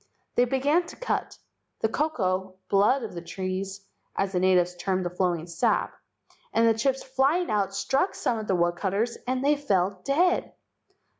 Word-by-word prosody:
They 245 - +4
began 285 +7 +1
to - - -10
cut. - - -3 0.4
The - - +3
koko 190 -9 -1
(blood) 215 +7 +3
of 220 - -6
the 170 - -6
trees, 190 +2 -4 0.3
as 195 0 0
the 180 - 0
natives 180 -1 +3
termed 185 +1 -1
the 175 - -2
flowing 175 -3 0
sap, 170 -1 0 0.6
and 230 0 +3
the 225 - +5
chips 260 +4 0
flying 270 +7 +1
out 195 -2 0
struck 275 - 0
some 230 - -1
of 215 - -6
the 190 - +2
woodcutters 190 +6 0
and 255 +1 0
they 295 +1 +5
fell 195 -9 0
dead. 345 +6 +2
200 Hz, 165 wpm, -26 LUFS, 185-265 Hz, 0.6 s, the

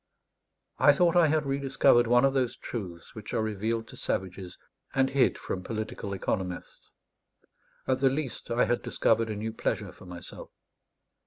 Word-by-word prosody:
I - - +7
thought 175 -1 +3
I 175 -2 +6
had 155 0 +1
rediscovered 135 -3 +3
one 120 +2 +5
of 135 - +2
those 130 -3 0
truths 90 -8 -7
which 110 -1 -7
are 110 - +1
revealed 110 +2 -2
to - - -10
savages 95 -1 -3 0.4
and 135 0 +3
hid 135 -1 +3
from 95 - -4
political 110 -2 -5
economists; 95 -2 -4 1.0
at 130 -1 +1
the 135 0 +4
least, 135 -1 -4
I 120 +1 +3
had 120 - 0
discovered 115 0 +1
a 110 - -3
new 110 +2 -4
pleasure - - -2
for 95 - -15
myself. 90 -1 -9
115 Hz, 160 wpm, -28 LUFS, 100-135 Hz, 1.0 s, I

